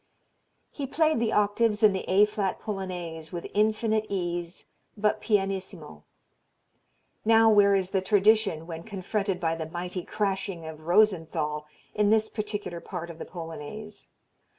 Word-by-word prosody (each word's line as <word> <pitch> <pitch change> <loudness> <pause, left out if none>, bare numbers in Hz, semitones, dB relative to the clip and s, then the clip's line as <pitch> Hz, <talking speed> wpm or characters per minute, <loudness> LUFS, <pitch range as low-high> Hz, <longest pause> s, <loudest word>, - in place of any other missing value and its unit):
He 280 -2 -5
played 315 0 +2
the 225 -1 +1
octaves 210 +1 +2
in 210 -2 +7
the 190 - -4
A 195 +3 +6
flat 205 -2 -2
Polonaise 180 -6 -5
with 175 -2 -5
infinite 215 +1 +1
ease 175 -2 -3 0.3
but 210 0 +1
pianissimo. 195 - -2 1.2
Now 225 0 +6
where 200 -1 +6
is 190 -1 0
the 195 -2 +1
"tradition" 205 -4 +3
when 165 -1 -6
confronted 195 0 -2
by 165 -1 0
the 160 -1 -5
mighty 180 +2 -4
crashing 195 -4 -2
of 155 0 -9
Rosenthal 165 -6 +2 0.3
in 210 -1 +2
this 220 0 +3
particular 205 -5 -4
part 170 -1 -6
of 165 - -13
the - - -5
Polonaise? 175 +5 -8
195 Hz, 140 wpm, -27 LUFS, 170-215 Hz, 1.2 s, in